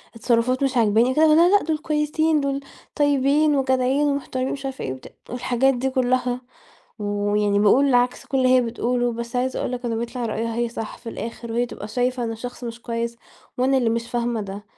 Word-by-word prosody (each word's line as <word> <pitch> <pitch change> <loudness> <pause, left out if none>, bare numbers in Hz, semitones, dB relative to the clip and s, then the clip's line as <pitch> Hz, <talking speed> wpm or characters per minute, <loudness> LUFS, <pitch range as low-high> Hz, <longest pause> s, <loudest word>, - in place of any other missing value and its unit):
التصّرفات 245 +3 +1
مش 265 -2 0
عاجباني." 225 +2 +4
قُلت 260 - -2
لها: 310 -1 +6
"لا، 340 +2 +6
لأ، - - -4
دول 315 0 -1
كويسين 305 +1 +1
دول 275 0 -1 0.4
طيبين 290 +1 +3
وجدعين 260 +2 +2
ومحترمين." 265 -2 -2
ومش 275 -1 -5
عارفة 270 -1 -5
إيه، 130 - -3
وبتاع 130 - -12 0.2
والحاجات 250 +2 +1
دي 260 +2 -1
كلّها، 250 -1 0 0.6
ويعني 205 0 0
باقول 255 +6 +4
عكس 245 0 +1
كل 270 - -1
اللي 255 -1 +3
هي 255 0 +5
بتقولُه، 240 +1 -1
بس 235 +1 -5
عايزة 255 +1 -1
أقول - - -2
لك 250 0 -5
إن 230 -1 -1
بيطلع 235 0 -3
رأيها 225 +1 -2
هي 235 0 0
صح 225 -2 -6
في 235 - -9
الآخر، 230 0 -6
وهي 240 +1 +1
بتبقى 215 -3 -8
شايفة 250 +1 -1
إن 225 - -2
الشخص 245 +2 -7
مش 230 0 -7
كويس، 235 0 -3 0.4
وأنا 265 +2 +3
اللي 235 -3 +1
مش 230 +1 -2
فاهمة 235 -2 -1
ده 200 0 -7
245 Hz, 205 wpm, -23 LUFS, 230-270 Hz, 0.6 s, لها